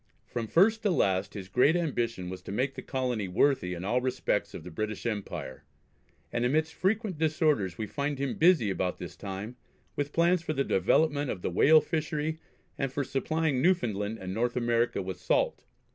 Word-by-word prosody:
From 115 -2 -4
first 215 - +4
to 210 - +1
last 95 - +1
his 95 -3 -6
great 125 - +4
ambition 120 - -1
was 95 0 -7
to 95 - -8
make 130 +6 0
the 130 - -7
colony 125 -6 -2
worthy 90 -2 +2
in 90 +2 -6
all 125 +5 +1
respects 130 0 -1
of - - -7
the 90 - -9
British 110 +6 -4
Empire, 105 - -4 0.7
and 120 - 0
amidst 155 +6 +1
frequent 200 -3 -1
disorders 150 - +1
we 110 - -2
find 140 +5 -2
him 135 -1 -1
busy 160 - +5
about 90 -1 -1
this - - -8
time 100 +5 -6 0.4
with 145 0 -2
plans 170 +2 +3
for 160 -2 -3
the 140 - +1
development 145 - +2
of 90 - -4
the - - -1
whale 155 - +6
fishery, 155 0 -2 0.4
and 135 -1 -1
for 140 +2 -1
supplying 150 0 0
Newfoundland 115 - +1
and 95 -2 -6
North 120 +3 0
America 120 -3 +1
with 95 0 -6
salt. - - 0
130 Hz, 185 wpm, -29 LUFS, 105-155 Hz, 0.7 s, whale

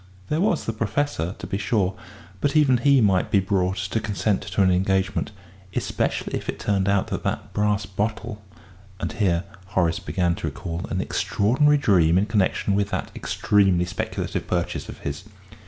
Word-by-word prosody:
There 155 +3 +1
was 215 +3 +1
the 115 - -2
Professor, 110 - -1
to - - -7
be 100 - -3
sure 105 -3 +1 0.5
but 145 +6 0
even 140 -5 +5
he 140 +1 +4
might 95 -4 +3
be 100 - +4
brought 95 -1 0
to 95 +4 -1
consent 105 -1 0
to 100 - 0
an 95 - +4
engagement, 95 +2 +1 0.5
especially - - -1
if - - -5
it - - -3
turned 100 -1 +1
out 100 -1 +1
that - - -3
the - - 0 0.2
brass 105 0 +1
bottle... 105 +3 -3 0.6
and - - -2
here 90 -4 +1 0.3
Horace 85 -3 +2
began 90 -2 0
to - - -3
recall 85 -1 -5
an 95 - -1
extraordinary 130 +12 +2
dream 90 - +4
in 95 - +3
connection 100 -1 +1
with 100 0 +1
that - - -3
extremely 95 -4 +2
speculative 90 +1 -3
purchase - - -2
of - - -8
his. 70 +7 -5
100 Hz, 170 wpm, -24 LUFS, 95-110 Hz, 0.6 s, even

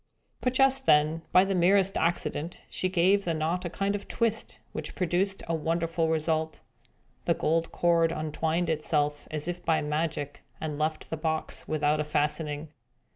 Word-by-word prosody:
But 250 0 -1
just 270 0 +4
then, 155 +2 +4
by 185 +1 +6
the 195 - 0
merest 190 +2 +3
accident, 170 -1 -1
she 185 - -1
gave 190 +3 +3
the 170 -3 -1
knot 165 +4 -1
a - - -2
kind 195 +3 -1
of 205 0 -5
twist, 225 -1 -1
which - - -5
produced 185 +2 0
a 165 - -1
wonderful 165 +1 0
result. 160 0 0 0.7
The - - +2
gold 165 +1 0
cord 170 -1 +3
untwined 160 +2 -1
itself, 150 -1 0
as 155 +1 -4
if 175 0 -4
by 165 -2 +2
magic, 150 -1 -2 0.2
and 150 -2 -4
left 155 0 -2
the 160 - -2
box 160 0 -2
without 150 0 +1
a - - +1
fastening. 150 0 -1
165 Hz, 165 wpm, -28 LUFS, 155-180 Hz, 0.7 s, by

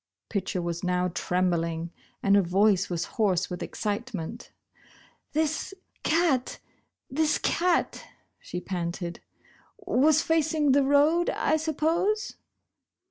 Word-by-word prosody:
Pitcher 190 -3 -2
was 170 +1 -3
now 180 0 +1
trembling 170 -2 -1 0.3
and 200 0 +4
her 200 - +6
voice 195 +2 +2
was 170 -1 -2 0.2
hoarse 190 -3 +1
with 175 - -5
excitement. 215 -1 -4 0.8
"This 315 +5 -1 0.3
cat 310 -6 +1 0.3
— - - -54
this 315 -1 +3
cat," 350 0 0 0.4
she 180 - -6
panted, 175 -1 -4 0.6
"was 315 -6 +3
facing 315 -2 +2
the 280 +2 +5
road, 295 +5 +3
I - - +1
suppose 325 +8 0
225 Hz, 110 wpm, -27 LUFS, -, 0.8 s, her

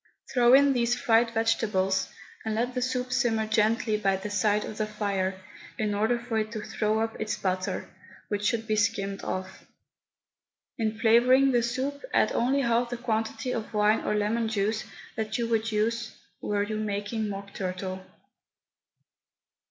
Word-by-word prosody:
Throw 245 0 +6
in 280 0 +5
these 240 -1 +2
fried 230 -1 +3
vegetables, 215 -4 +1 0.3
and 220 -1 -2
let 245 +3 -1
the 250 - -2
soup 255 0 -1
simmer 225 -3 +1
gently 215 0 +2
by 195 -2 +1
the 205 +2 -6
side 210 0 +2
of 215 - -7
the 215 - 0
fire, 195 -3 -2 0.4
in 210 -1 0
order 220 +4 +1
for 235 -2 -2
it 215 0 -2
to 215 - -4
throw 215 +1 0
up 225 -1 -3
its 215 0 -2
butter, 185 0 -2 0.4
which 205 -1 -2
should 225 +1 0
be 215 - 0
skimmed 200 -1 0
off. 185 0 -5 1.1
In 220 -1 -1
flavouring 250 +4 +5
the 240 -2 +3
soup, 260 +4 -2
add - - +4
only 265 +4 +2
half 235 -1 +1
the 245 - -4
quantity 225 +1 -2
of 225 -2 -4
wine 210 +1 +4
or - - -1
lemon 220 +2 0
juice 215 0 -1 0.3
that 220 0 -2
you 235 -1 -1
would 225 0 0
use 220 +1 -1 0.3
were 205 -1 0
you 215 +1 -3
making 210 +1 -2
Mock 195 0 -7
Turtle. 185 0 -4
220 Hz, 165 wpm, -27 LUFS, 210-235 Hz, 1.1 s, Throw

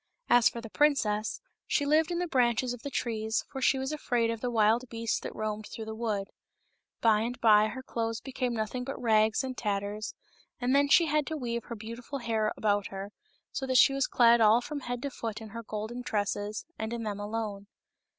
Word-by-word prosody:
As 240 -2 +7
for 235 - -7
the 225 - -9
princess, 220 -8 +1 0.3
she 285 - +1
lived 310 +3 +3
in 345 - -1
the 355 - 0
branches 245 -4 +1
of 245 - -9
the 280 - -5
trees, 220 -3 -1
for 265 - -5
she 265 - +4
was 265 +2 -2
afraid 240 -6 0
of 230 -1 -5
the 250 - -1
wild 230 +2 +2
beasts 230 -1 -1
that - - -7
roamed 215 0 -3
through 220 - -7
the 220 - -5
wood. 215 -3 -2 0.7
By 220 -2 +5
and 240 +3 -3
by 215 -2 +6
her 260 +4 -6
clothes 230 -2 -2
became 255 -2 -3
nothing 220 +3 -2
but 270 +2 -5
rags 220 0 +3
and 260 -1 -4
tatters, 205 0 -3 0.4
and 255 +1 +1
then 285 0 +4
she 340 +3 +6
had 300 -1 +1
to 315 - -3
weave 235 -4 -3
her 235 - -6
beautiful 230 +5 -7
hair 225 -4 0
about 205 -2 +1
her, 195 +1 -7 0.4
so 265 - -3
that 260 -1 +3
she 275 - +7
was 275 -1 +1
clad 235 -1 +5
all 220 +2 +6
from 290 +4 -5
head 245 -2 -5
to 280 - -2
foot 225 -4 -5
in 220 -1 -9
her 230 +3 -6
golden 220 +2 -5
tresses, 205 -1 -2
and 220 +1 -3
in 235 -1 -3
them 205 -2 -3
alone. 205 -1 -4
230 Hz, 215 wpm, -29 LUFS, 215-255 Hz, 0.7 s, As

